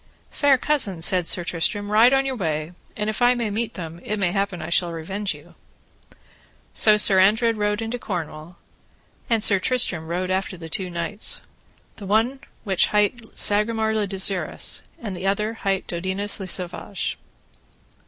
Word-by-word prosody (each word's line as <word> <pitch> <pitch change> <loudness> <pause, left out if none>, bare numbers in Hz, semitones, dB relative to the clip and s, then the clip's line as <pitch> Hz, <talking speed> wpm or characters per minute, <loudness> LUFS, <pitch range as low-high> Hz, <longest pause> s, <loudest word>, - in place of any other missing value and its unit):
Fair 285 -2 +3
cousin, 250 - 0
said 180 -1 +2
Sir 175 - +2
Tristram, 205 +5 -1
ride 225 +4 +6
on 270 0 +3
your 265 -1 -2
way, 160 -6 -3 0.3
and 210 0 -2
if 215 +3 -3
I 245 +1 +5
may 235 -3 -2
meet 225 +2 -3
them 165 -2 -7
it 210 - -3
may 190 -4 0
happen 195 -2 -2
I - - -6
shall 175 0 +2
revenge 190 +5 -3
you. - - -16 1.2
So 215 -1 +5
Sir 195 -2 +6
Andred 220 +4 +4
rode 210 +1 -1
into 230 +2 -4
Cornwall, 170 -4 -6 0.7
and 225 -3 +2
Sir 200 -3 +5
Tristram 185 -8 0
rode 180 +2 -2
after 190 0 -2
the 165 -1 -9
two 185 +3 -2
knights, 175 +5 +3 0.6
the 200 - -8 0.6
which 190 -4 +2
one - - -10
hight 210 +2 0
Sagramore 220 +1 +2
le 215 -2 0
Desirous, 190 -1 -2 0.2
and 205 -5 -5
the 180 +2 -4
other 210 +3 0
hight 195 -4 -2
Dodinas 190 +4 -2
le 190 - -5
Savage. 180 +2 -3
200 Hz, 165 wpm, -23 LUFS, 180-220 Hz, 1.2 s, ride